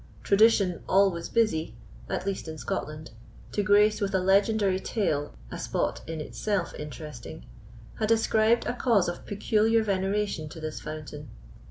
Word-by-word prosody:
Tradition, 200 -3 +4
always 190 -3 +3
busy, 160 - +1 0.3
at - - -2
least 195 -3 -3
in 160 0 -6
Scotland, 155 +1 -5 0.4
to 205 - 0
grace 210 +1 +4
with 195 -1 0
a - - +3
legendary 195 +1 +3
tale 150 -10 -1 0.2
a - - -6
spot - - -2
in 165 -1 -4
itself 185 +4 -2
interesting, 150 -1 -8 0.5
had 215 -1 0
ascribed 225 0 +3
a - - -1
cause 235 -6 +2
of 175 - -5
peculiar 220 +2 +2
veneration 195 -4 -1
to 160 - -10
this 155 -1 -5
fountain. 150 -1 -8
195 Hz, 145 wpm, -27 LUFS, 160-215 Hz, 0.5 s, Tradition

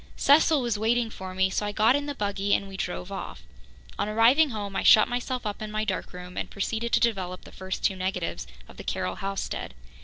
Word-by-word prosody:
Cecil 290 0 +4
was 235 -4 -1
waiting 230 +1 +1
for 185 -2 -8
me, 190 0 +2
so 210 - -1
I 205 - -2
got 220 +4 +4
in 285 0 -2
the 285 - -3
buggy 200 -2 0
and 200 - -2
we 195 - -9
drove 190 0 -4
off. 195 - -6 0.6
On 210 - 0
arriving 240 +8 +5
home 205 -4 -5
I - - +1
shut 215 - +7
myself 250 0 -3
up 210 0 -4
in 215 - -4
my 215 0 -2
dark 195 -3 -3
room 180 0 -9
and - - -3
proceeded 225 +4 -2
to - - +5
develop 190 -6 -1
the - - -13
first 190 0 -5
two 190 - +2
negatives 185 +2 -3 0.2
of - - -15
the - - -8
Carroll - - -2
housestead. 195 - -4
210 Hz, 225 wpm, -27 LUFS, 195-235 Hz, 0.6 s, shut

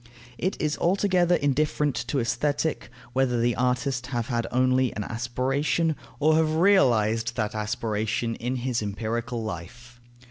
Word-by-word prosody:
It 185 +4 -1
is 150 -1 -1
altogether 180 -1 +3
indifferent 145 0 +1
to 140 - -1
Aesthetic 145 +6 -1 0.2
whether 130 -2 +1
the 120 0 +2
artist 125 +1 0
have 120 -3 -3
had 120 -2 -1
only 130 0 +2
an 105 - -2
aspiration, 135 +8 0 0.2
or 155 +1 +4
have 155 -1 +2
realized 115 - +3
that 105 -3 -1
aspiration 110 +2 -2
in 125 +2 -2
his 125 -2 -1
empirical 115 +3 -3
life. 120 +6 -8
125 Hz, 135 wpm, -26 LUFS, 115-150 Hz, 0.2 s, or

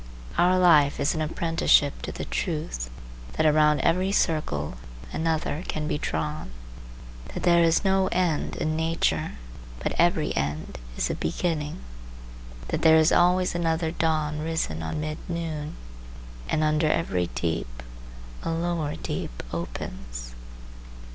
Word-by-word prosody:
Our 180 +1 +4
life 155 -6 +5
is 140 - +2
an 160 - -2
apprenticeship 165 - +2
to - - -4
the - - -5
truth 60 - -3 0.4
that 155 - +1
around 150 -1 +4
every 185 +5 +2
circle 115 - 0 0.4
another 160 0 -1
can 150 -1 -2
be 150 - -1
drawn; 75 -1 -3 0.9
that - - -4
there 170 -1 +5
is 165 +4 +3
no 190 0 +3
end 175 -5 0
in 155 0 -1
nature, 165 +1 0 0.5
but - - -2
every 170 -2 +2
end 75 -1 -3 0.2
is - - 0
a - - 0
beginning; 150 - -2 0.9
that - - -1
there 160 0 +7
is 160 +1 +5
always 180 +1 +4
another 165 -1 0
dawn 155 -2 0
risen 155 - -2
on 80 - -3
mid 155 0 -4
noon, 160 -3 -3 0.7
and 155 - +1
under 155 +1 +2
every 90 - 0
deep 70 -8 -3 0.6
a - - -3
lower 165 -2 -1
deep - - -5
opens. - - -6
155 Hz, 135 wpm, -26 LUFS, -, 0.9 s, there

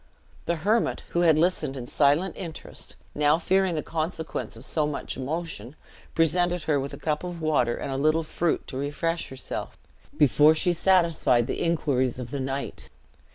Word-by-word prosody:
The 170 - +1
hermit, 210 +8 +1
who 170 - -1
had 160 -3 +5
listened 155 -5 +1
in 125 - -5
silent 145 +8 +2
interest, 165 -4 -7 0.2
now, 150 +1 +3
fearing 190 +1 +1
the 155 - -2
consequence 160 -4 -3
of 115 +4 -9
so 150 -1 +1
much 150 - -4
emotion, 145 -3 -4 0.4
presented 175 +1 +2
her 150 -2 +1
with 140 +1 -4
a - - -11
cup 150 0 -2
of 175 -1 -5
water 150 -7 +1
and 140 - -4
a 135 - -2
little 155 +3 +2
fruit, 165 +1 -1
to 130 - -5
refresh 155 +4 -2
herself, 130 0 -5 0.4
before 150 +2 +5
she 175 +2 +2
satisfied 170 -9 +3
the - - -3
inquiries 140 -7 +1
of 125 -1 -6
the 140 - -3
knight. 135 +1 -4
155 Hz, 170 wpm, -26 LUFS, 140-170 Hz, 0.4 s, had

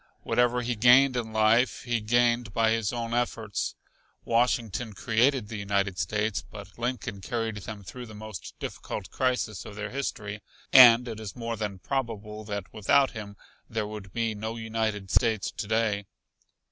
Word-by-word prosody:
Whatever 125 0 +2
he 120 0 -1
gained 125 +4 +6
in 115 -2 -2
life, 110 +3 +3
he 120 -2 -1
gained 120 0 +2
by 115 -1 +3
his 115 -3 0
own 115 -1 -3
efforts. 115 -4 -1 0.5
Washington 115 -1 +1
created 115 +3 +2
the 110 -1 -6
United 100 -2 0
States, 105 0 -1
but 100 0 -11
Lincoln 120 -5 -3
carried 115 +1 -2
them 105 0 -7
through 125 +5 -8
the 110 - -11
most 110 -3 -8
difficult 100 - -6
crisis 125 -5 -1
of 110 - -10
their 105 0 -5
history 105 -6 -4 0.3
and 125 -1 +9
it 110 -2 -5
is 110 -3 -7
more 115 -1 -3
than 105 -3 -4
probable 110 -3 -4
that 100 -3 -5
without 135 +6 +3
him 105 -3 -8 0.3
there 110 -1 -2
would 105 -2 -8
be 115 0 -1
no 110 +2 -4
United 110 -3 -2
States 110 -4 +2
to - - -5
day. 110 -2 0
110 Hz, 160 wpm, -27 LUFS, 105-120 Hz, 0.5 s, and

